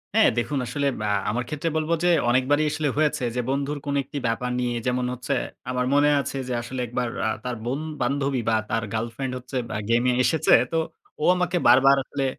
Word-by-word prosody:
হ্যাঁ, 220 - +6
দেখুন, 125 +4 -1
আসলে 140 +4 -2 0.2
আ - - 0 0.2
আমার 120 +4 -1
ক্ষেত্রে 150 +2 -2
বলব 155 0 -2
যে 175 - +4 0.2
অনেকবারই 130 +5 +3
আসলে 155 -1 -1
হয়েছে, 150 -2 +1
যে 125 - +1
বন্ধুর 140 +2 -1
কোন 140 0 -1
একটি 140 +3 -8
ব্যাপার 125 +2 -1
নিয়ে, 120 -1 -1
যেমন 125 0 0
হচ্ছে, 125 0 -3 0.4
আমার 125 0 0
মনে 145 +1 +5
আছে 140 - -3
যে 125 - -2
আসলে 125 +2 -6
একবার 120 +1 -2 0.2
আ - - +1
তার 125 -1 -3
বন 130 +4 -1 0.2
বান্ধবী 135 0 0
বা 110 - +3
তার 115 - 0
গার্লফ্রেন্ড 120 +4 -3
হচ্ছে 125 +1 -6
ব্যা - - -3
গেমে 120 +2 +3
এসেছে। 160 +4 +3 0.2
তো 165 - 0 0.4
ও - - -1
আমাকে 180 0 0
বারবার 135 +2 +7
আসলে 135 +1 -3
130 Hz, 200 wpm, -24 LUFS, 125-145 Hz, 0.4 s, বারবার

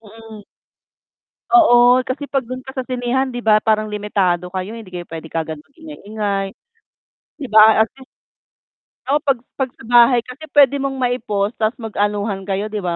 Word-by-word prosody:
mm. 225 0 -13 1.1
Oo. 245 -7 +6
Kasi 275 +3 -4
'pag 275 -1 -1
do'n 255 +1 -7
ka 265 - -8
sa 260 - -3
sinehan 255 +1 -1
'di 245 - -6
ba 215 -1 +3
parang 215 -1 +1
limitado 195 -4 -1
kayo, 190 +4 -5
hindi 225 -5 -11
kayo 175 -1 -7
puwede 160 -1 -9
kaagad 160 -1 -4
mag-ingay-ingay. 210 - -5 0.9
'Di 280 - -6
ba? 220 0 +7
At - - -13
least 260 - -15 1.0
oo, 295 - +3
'pag 275 -4 0 0.2
'pag 265 - 0
sa - - -16
bahay 240 +1 +5
kasi 275 +6 -11
puwede 280 -1 +5
mong 275 0 -2
mai-pause 220 -5 -1
ta's 220 +2 0
mag-anuhan 205 -3 -3
kayo, 200 +2 -2
'di 215 - -3
ba? 175 -3 -2
220 Hz, 165 wpm, -19 LUFS, 205-255 Hz, 1.1 s, ba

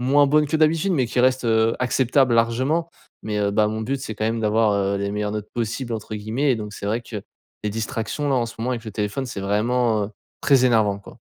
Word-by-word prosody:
moins 140 +3 +4
bonnes 150 +2 +3
que 160 +2 0
d'habitude 160 +5 +2
mais 135 -7 +2
qui 125 - 0
restent, 130 0 +2
heu, 115 0 +3
acceptables 130 +1 +2
largement 130 +9 +1 0.4
mais, 105 -1 -2
heu, 100 -1 +1
bah, 105 +1 +3
mon 110 +1 -3
but 135 +4 -2
c'est 110 -4 -5
quand 110 - -2
même 115 +1 0
d'avoir, 110 0 +2
heu, 100 0 0
les 100 0 -2
meilleures 105 0 -2
notes 105 -1 -5
possibles 120 +1 -3
entre 110 -1 -5
guillemets 115 +7 0
et 120 - 0
donc 105 -1 -6
c'est 100 - -6
vrai 110 +4 0
que 110 -4 -7 0.4
les 105 - 0
distractions 115 +6 -3
là 135 - +2
en 120 -2 +1
ce 115 - -9
moment 120 +3 -2
avec 120 -2 -3
le 110 - -6
téléphone 105 +5 -2
c'est 110 -5 -6
vraiment, 110 +2 +1
heu, - - -11 0.3
très 135 -3 +4
énervant 110 -5 +3
quoi. 100 - -14
115 Hz, 245 wpm, -23 LUFS, 105-130 Hz, 0.4 s, moins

